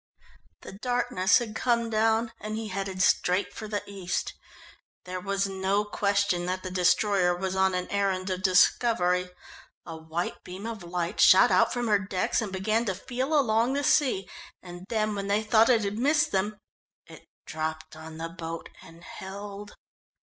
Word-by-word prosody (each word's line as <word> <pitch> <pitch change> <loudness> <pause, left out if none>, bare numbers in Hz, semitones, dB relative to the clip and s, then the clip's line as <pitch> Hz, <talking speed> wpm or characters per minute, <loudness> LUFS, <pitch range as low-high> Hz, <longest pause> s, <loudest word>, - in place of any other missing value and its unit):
The - - -10
darkness 240 -2 +1
had 235 -4 -4
come 235 0 0
down, 225 +1 +1
and 215 0 -4
he 220 -1 -4
headed 190 -1 -2
straight 185 +2 +2
for 215 - -7
the 210 -1 -3
east. 190 -3 -4 0.7
There 185 0 -5
was 195 +1 -1
no 195 +2 0
question 200 -3 0
that 185 +1 -3
the 185 - -5
destroyer 180 0 +2
was 190 +1 -3
on 190 -1 +2
an 180 0 -2
errand 195 -2 0
of 185 0 -3
discovery. 180 -1 +3 0.6
A 165 - -7
white 160 +2 -5
beam 185 +4 -8
of 225 -3 -5
light 175 +2 -3
shot - - +7
out - - +4
from 245 -1 -2
her 210 -2 +3
decks, 190 +1 -1
and 210 -3 -4
began 215 +4 0
to 190 -4 -1
feel 260 - -1
along 230 0 +2
the 285 +1 -1
sea. 255 -10 +2 0.4
And 175 +1 -10
then 215 -2 0
when 200 -1 -4
they 205 +2 +1
thought 220 +1 +4
it 230 -4 +4
had 205 +2 -3
missed 300 +4 +2
them, 205 +2 -1 0.5
it - - -15 0.2
dropped 155 0 -5
on 160 0 -10
the 165 +1 -5
boat 165 -1 -7
and 165 +1 -15
held. 200 +2 -9
200 Hz, 170 wpm, -27 LUFS, 180-220 Hz, 0.7 s, shot